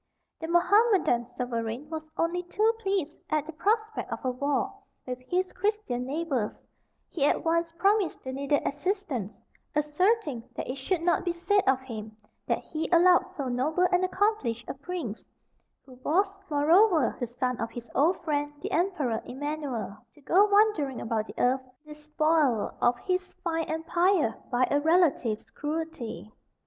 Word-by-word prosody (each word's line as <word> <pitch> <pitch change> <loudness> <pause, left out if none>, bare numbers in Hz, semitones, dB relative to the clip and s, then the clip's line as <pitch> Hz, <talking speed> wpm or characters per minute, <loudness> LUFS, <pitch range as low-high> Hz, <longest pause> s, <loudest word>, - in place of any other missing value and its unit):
The 320 - -5
Mohammedan 360 - +3
sovereign 240 +2 -4
was 315 0 -5
only 340 +2 0
too 425 +6 +1
pleased 385 -7 -1
at 305 -1 +1
the 325 - -7
prospect 435 +6 -1
of - - -5
a 255 - +2
war 280 +3 -1 0.3
with 250 -1 -4
his 370 +1 0
Christian 390 - -1
neighbours; 280 -7 -2 0.5
he 305 - -3
at - - +1
once 335 0 +1
promised 390 +1 +1
the 260 - -4
needed 280 +2 0
assistance, 280 - -3 0.3
asserting 300 - +1
that - - -4
it 255 - -4
should 330 +6 -1
not 350 +1 +2
be 355 - 0
said 390 +4 +2
of 265 0 +4
him 220 -4 -8 0.3
that - - 0
he 320 0 -4
allowed 355 +1 +6
so 280 -3 -2
noble 290 +9 +1
and 360 0 +3
accomplished 370 - 0
a - - -3
prince 275 - -5 0.6
(who 260 - -14
was, 390 +5 +1
moreover, 320 - +4
the 245 - -2
son 250 +1 -2
of 230 - -2
his 240 0 -8
old 325 +7 +3
friend, 290 -2 -1
the - - -3
Emperor 310 - 0
Emanuel), 270 -6 -4 0.2
to 295 - -19
go 370 +8 +5
wandering 405 - +3
about 220 -1 -2
the - - -10
earth, 260 +2 +2 0.2
despoiled 300 -5 +1
of 240 0 +3
his 370 +7 -2
fine 330 -2 0
empire 330 - +1 0.2
by 250 0 +3
a 285 - +4
relative's 300 -9 +2
cruelty. 295 - -5
305 Hz, 155 wpm, -28 LUFS, 255-360 Hz, 0.6 s, allowed